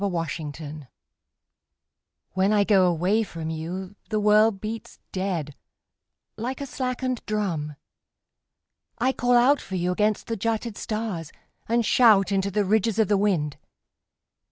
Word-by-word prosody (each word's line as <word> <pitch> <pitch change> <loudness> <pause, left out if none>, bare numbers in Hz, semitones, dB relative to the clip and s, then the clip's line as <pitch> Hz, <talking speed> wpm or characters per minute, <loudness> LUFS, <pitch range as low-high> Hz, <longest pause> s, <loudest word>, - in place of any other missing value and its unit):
The 200 - +1
Taxi 155 -3 -5 1.4
When 190 +2 +2
I 210 -1 +4
go 195 -3 +4
away 180 +6 +2
from 165 -6 -5
you 180 +5 -5
The 215 -1 0
world 210 0 +4
beats 220 +1 -6
dead 180 -6 -2 0.8
Like 250 +5 -4
a 280 - -4
slackened 255 -2 -3
drum. 170 -9 -2 1.2
I 255 +3 +2
call 245 -1 +1
out 270 +4 +4
for 190 - -6
you 180 0 0
against 210 +3 0
the 230 - -3
jutted 225 +1 -2
stars 210 -9 -4 0.4
And 235 0 +2
shout 210 -6 +5
into 195 0 +1
the 205 +1 0
ridges 220 +2 +1
of 220 -4 +2
the 205 - +4
wind. 175 -8 0
205 Hz, 135 wpm, -25 LUFS, 175-225 Hz, 1.4 s, shout